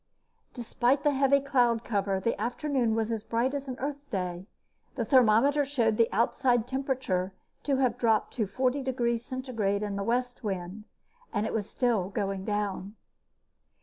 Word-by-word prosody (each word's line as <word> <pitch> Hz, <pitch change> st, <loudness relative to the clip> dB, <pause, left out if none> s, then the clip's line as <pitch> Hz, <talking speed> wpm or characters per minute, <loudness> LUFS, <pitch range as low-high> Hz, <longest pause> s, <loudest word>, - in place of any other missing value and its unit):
Despite 250 Hz, +3 st, +1 dB
the 295 Hz, -, +4 dB
heavy 275 Hz, +1 st, +4 dB
cloud 245 Hz, -4 st, +2 dB
cover, 200 Hz, -3 st, 0 dB
the 210 Hz, +1 st, -1 dB
afternoon 245 Hz, -1 st, 0 dB
was 225 Hz, 0 st, -1 dB
as 220 Hz, -2 st, -2 dB
bright 235 Hz, +5 st, 0 dB
as 280 Hz, -1 st, -4 dB
an 255 Hz, -1 st, -5 dB
Earth 285 Hz, +1 st, -5 dB
day. 180 Hz, -3 st, -3 dB, 0.5 s
The 235 Hz, -4 st, -1 dB
thermometer 260 Hz, +4 st, +4 dB
showed 240 Hz, -6 st, +1 dB
the 230 Hz, -, +3 dB
outside 240 Hz, +1 st, +2 dB
temperature 260 Hz, -9 st, -1 dB, 0.3 s
to 280 Hz, -, 0 dB
have 255 Hz, -3 st, +1 dB
dropped 225 Hz, -2 st, +2 dB
to 220 Hz, -5 st, -1 dB
40 255 Hz, +6 st, 0 dB
degrees 240 Hz, -3 st, -1 dB
Centigrade 225 Hz, -7 st, -2 dB
in 205 Hz, -1 st, -3 dB
the 200 Hz, -, -2 dB
west 245 Hz, +3 st, -1 dB
wind, 195 Hz, +1 st, -4 dB, 0.5 s
and 210 Hz, -, -1 dB
it -, -, -3 dB
was 210 Hz, -2 st, -2 dB
still 225 Hz, -7 st, 0 dB
going 195 Hz, -1 st, -3 dB
down. 205 Hz, -1 st, -2 dB
235 Hz, 160 wpm, -28 LUFS, 205-265 Hz, 0.5 s, the